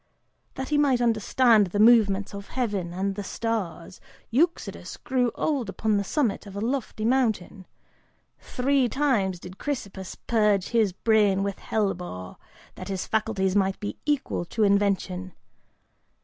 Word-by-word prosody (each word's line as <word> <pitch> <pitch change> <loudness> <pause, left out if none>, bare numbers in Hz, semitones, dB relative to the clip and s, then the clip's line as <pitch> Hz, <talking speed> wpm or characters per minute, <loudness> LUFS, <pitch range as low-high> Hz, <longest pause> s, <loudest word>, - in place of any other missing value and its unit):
That 265 0 -5
he 295 -1 +2
might 275 -4 +3
understand 230 -1 +3
the 205 +3 -3
movements 210 -4 +4
of 200 0 -8
heaven 205 -9 -2
and 195 +3 -2
the 205 +1 -5
stars, 195 -6 -4 0.3
Eudoxus 330 +9 -1
grew 250 -2 0
old 275 -9 -1
upon 215 +1 0
the 200 - 0
summit 225 -2 -1
of 200 - -10
a - - -3
lofty 230 -1 -2
mountain: 220 -7 0 0.7
three 265 0 +1
times 225 -11 +1
did 180 +2 -11
Chrysippus 200 -10 -5
purge 210 -4 +1
his 225 -4 +2
brain 205 0 +2
with 200 -1 -3
hellebore, 180 - -3 0.4
that - - -9
his 190 -2 -3
faculties 205 -3 0
might 195 -1 +1
be 205 - -4
equal 290 -11 0
to 215 +5 -1
invention. 200 -2 +1
210 Hz, 140 wpm, -26 LUFS, 195-240 Hz, 0.7 s, movements